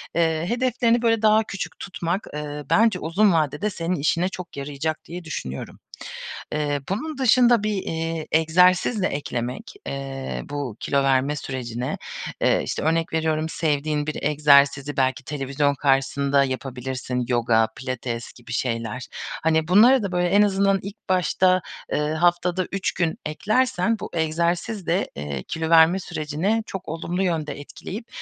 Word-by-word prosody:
eee, 165 -1 +1
hedeflerini 240 -1 +2
böyle 230 -2 +2
daha 215 0 +5
küçük 200 -2 -6
tutmak, 180 +1 -3
eee, 150 0 -5
bence 185 +4 +4
uzun 185 +5 +3
vadede 155 +5 0
senin 175 -2 -2
işine 170 +4 +1
çok 180 -5 -9
yarayacak 145 +3 -3
diye 175 +2 -7
düşünüyorum. 70 - -6 0.7
Eee, 145 -2 -1
bunun 275 +10 -3
dışında 245 -3 +5
bir, 215 - 0
iii, 165 -4 -3
egzersiz 180 +7 +4
de 185 - +3
eklemek, 125 - -4
eee, 135 -1 -4
bu 145 -6 -5
kilo 140 -1 +1
verme 135 +2 +2
sürecine, 125 -3 -4 0.4
eee, - - +3
işte, - - -3
örnek 165 +1 +1
veriyorum 160 0 0
sevdiğin 150 -1 -1
bir 155 - -4
egzersizi 145 -1 +4
belki 130 0 +1
televizyon 140 0 -1
karşısında 140 0 +2
yapabilirsin. 130 -1 -3
Yoga, 115 -2 +3
pilates 125 -2 -5
gibi 120 -1 -13
şeyler. 115 0 -2 0.4
Hani, 160 -1 +2
bunları 225 +7 +6
da 200 - -2
böyle 180 -1 +1
en 200 +3 +5
azından 195 -1 +3
ilk 200 +1 -10
başta, 185 0 +3 0.3
eee, 150 0 0
haftada 175 +2 +1
3 195 0 -1
gün 165 -2 -1
eklersen 215 +5 +1
bu - - -6
egzersiz 170 +5 -1
de, 180 +4 +1
eee, 70 -2 -5
kilo 160 -1 -3
verme 165 +3 +6
sürecini 170 +7 -1
çok 190 -1 -6
olumlu 170 +4 -2
yönde 155 -5 -2
etkileyip 205 - -8
160 Hz, 145 wpm, -23 LUFS, 140-185 Hz, 0.7 s, bunları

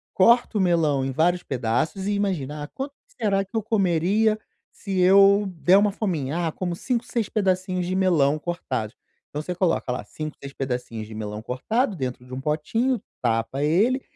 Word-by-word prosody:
corta 235 +2 +4
o - - +1
melão 160 -7 +2
em 135 - -2
vários 175 +6 +2
pedaços 130 - -1
e 205 - +1
imagina, 150 -8 -2
ah 145 - -6
quanto 275 - -6 0.3
será 195 -2 +2
que 195 - -28
eu - - +3
comeria 205 +1 +2 0.3
se 195 -3 -5
eu 195 +2 +6
der 180 +4 +5
uma 205 +1 +4
fominha? 170 -6 -2
Ah 160 - -1
como 175 -2 -3
5, 245 +4 -1
6 230 -3 -2
pedacinhos 185 -2 0
de 185 +1 -2
melão 155 -6 +3
cortados. 130 -10 -3 0.3
Então 150 +1 -4
você 180 +2 -4
coloca 175 -8 +1
lá 125 -3 -3
5, 155 +8 -7
6 140 0 -8
pedacinhos 125 -5 -4
de 110 - -9
melão 105 0 -5
cortado 205 - -1
dentro 125 -3 -4
de 125 - -14
um 130 - -4
potinho 220 - 0 0.2
tapa 115 +4 0
ele 210 - +3
175 Hz, 180 wpm, -24 LUFS, 135-200 Hz, 0.3 s, eu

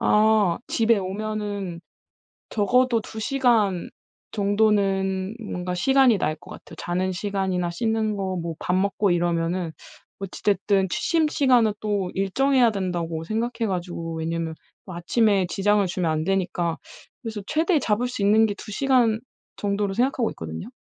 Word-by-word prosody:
아 210 -4 +3
집에 230 -1 +3
오면은 200 -2 -4 0.7
적어도 235 +3 +2
2 220 +1 -8
시간 220 -7 +1 0.4
정도는 200 -2 +1
뭔가 180 -3 -4
시간이 260 +3 +4
날 155 -3 -1
것 - - -15
같아요. - - -11
자는 185 +2 -1
시간이나 190 -2 -1
씻는 220 +3 -1
거 190 -1 -2
뭐 165 -1 -4
밥 180 - -1
먹고 195 0 +1
이러면은 170 0 0 0.5
어찌 195 -1 -7
됐든 200 -1 +2
취침 320 - +1
시간은 250 -8 +3
또 200 -3 -1
일정해야 245 +5 +3
된다고 175 -5 -3
생각해 230 +4 -2
가지고 175 -3 -4
왜냐하면 165 0 -3 0.3
뭐 185 -3 -8
아침에 195 +1 +2
지장을 205 +1 +2
주면 175 -2 -1
안 155 0 -1
되니까 175 -2 -1 0.4
그래서 225 -3 -5
최대 320 +1 +2
잡을 230 0 0
수 245 -4 -5
있는 215 +2 +5
게 205 - -1
2 210 - -10
시간 245 -3 +2 0.4
정도로 200 -1 -1
생각하고 245 0 +1
있거든요. 80 0 -7
200 Hz, 300 characters per minute, -24 LUFS, 180-220 Hz, 0.7 s, 있는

